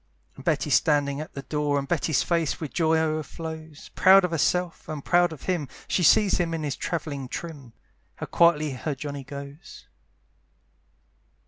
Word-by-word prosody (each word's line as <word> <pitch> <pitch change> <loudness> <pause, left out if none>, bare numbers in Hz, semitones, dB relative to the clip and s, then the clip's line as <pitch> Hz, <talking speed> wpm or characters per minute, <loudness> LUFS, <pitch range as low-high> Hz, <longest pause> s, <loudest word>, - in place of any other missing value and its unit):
And - - -12
Betty's - - 0
standing 145 -1 +2
at 155 - -10
the 140 - -6
door, 150 0 -1
And 140 0 -2
Betty's 155 -3 +1
face 165 -3 0
with 155 -4 -6
joy 160 -1 +2
o'erflows, 160 0 -4
Proud 190 0 +6
of 180 - -3
herself, 170 +1 0
and 150 -3 -6
proud 175 -1 +3
of 160 - -10
him, 175 -6 -1 0.2
She - - 0
sees 205 +3 +4
him 165 -2 0
in 160 - -4
his 145 -2 -2
travelling 145 -6 -4
trim; 140 -5 -7 0.4
How - - -6
quietly 155 -3 +3
her 140 +3 -4
Johnny 140 0 -6
goes. 140 +4 -10
155 Hz, 160 wpm, -25 LUFS, 145-170 Hz, 0.4 s, Proud